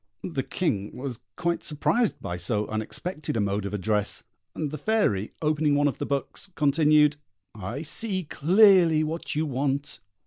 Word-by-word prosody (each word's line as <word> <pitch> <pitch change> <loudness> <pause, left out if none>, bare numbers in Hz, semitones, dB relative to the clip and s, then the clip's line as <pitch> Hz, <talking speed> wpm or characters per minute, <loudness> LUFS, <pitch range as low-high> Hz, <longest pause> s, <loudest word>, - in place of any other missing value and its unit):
The - - -2
King 100 0 -2
was 125 -2 -5 0.2
quite 170 -1 -1
surprised 205 +9 +1
by 85 - -3
so 105 +4 0
unexpected 130 - -3
a - - +1
mode 100 0 -1
of 100 - -7
address; 105 +1 0 0.3
and 150 -3 -3
the 155 - -5
Fairy, 145 - +1
opening 150 -1 +2
one 145 0 +3
of 140 - -3
the - - -3
books, 140 +7 -1
continued: 150 0 +4 0.4
"I 110 - -5
see 185 +4 -1
clearly 170 0 +5
what 160 +1 -3
you 155 +1 +1
want. 140 +1 -2
145 Hz, 160 wpm, -26 LUFS, 110-160 Hz, 0.4 s, clearly